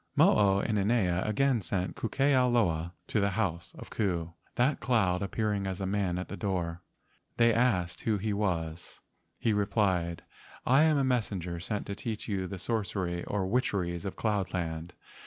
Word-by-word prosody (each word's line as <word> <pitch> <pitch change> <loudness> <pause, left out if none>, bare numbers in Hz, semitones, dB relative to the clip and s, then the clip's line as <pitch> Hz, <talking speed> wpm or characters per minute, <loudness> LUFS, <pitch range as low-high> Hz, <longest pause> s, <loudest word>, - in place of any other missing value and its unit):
Mo - - +6
o 100 -1 +4
inanea 100 -4 +1
again 125 +2 +2
sent 90 +1 -2
Ku 115 - -3
ke 140 - -5
ao 130 -1 +4
loa 85 -8 +1
to 110 - 0
the 100 0 +2
house 85 -6 -1
of - - -10
Ku, 85 -6 -1 0.2
that 130 +4 +2
cloud 95 -8 +2
appearing 100 0 -1
as 95 0 -3
a 95 - -2
man 95 -2 0
at 90 - -4
their 100 - -6
door. 90 -4 -2 0.6
They 115 -1 +5
asked 90 -8 +1
who 110 -2 +1
he 105 +2 -1
was. 85 -5 -2 0.4
He 115 - +1
replied: 95 -5 +1 0.4
"I 135 +4 +5
am 155 -1 +4
a 140 - +2
messenger 100 -9 -1
sent 105 +4 -3
to 100 - -4
teach 110 +1 -5
you 95 -4 -1
the 95 - -6
sorcery 95 -4 -2
or 100 -2 -1
witcheries 95 -5 0
of 95 - -4
cloud 105 -4 -1
land. 85 -1 -3
100 Hz, 175 wpm, -30 LUFS, 90-110 Hz, 0.6 s, Mo